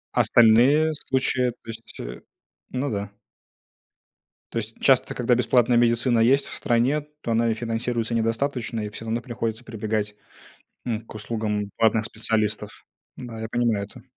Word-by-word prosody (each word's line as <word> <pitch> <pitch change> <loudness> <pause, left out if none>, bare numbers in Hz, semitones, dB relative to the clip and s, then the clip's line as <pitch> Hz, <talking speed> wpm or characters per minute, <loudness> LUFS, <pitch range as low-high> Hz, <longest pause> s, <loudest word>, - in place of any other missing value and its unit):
А - - +5
остальные 125 +8 +5
случаи, 130 -3 0
э, - - 0
то 115 - -17
есть, 115 0 -9
э, - - -7 0.5
ну 130 +2 -2
да. 100 -1 -3 1.4
То - - -2
есть 115 0 -5
часто, 135 -2 +3
когда 125 0 +2
бесплатная 120 0 +3
медицина 120 0 +3
есть 135 +5 +4
в - - -8
стране, 130 +3 +1 0.2
то 115 - -3
она 115 +1 +2
и 110 - +1
финансируется 115 0 -2
недостаточно, 115 +1 -1
и 105 - -4
всё 110 +2 -9
равно 115 +1 -1
приходится 115 -1 -4
прибегать 110 -2 -3 0.7
н 115 -3 -1
к - - -11
услугам 105 -1 -2
платных 110 -1 +3
специалистов. 110 -1 -2 0.3
Да, 120 -3 -8
я 110 - -4
понимаю 115 -3 0
это. 105 - -14
115 Hz, 155 wpm, -24 LUFS, 110-125 Hz, 1.4 s, А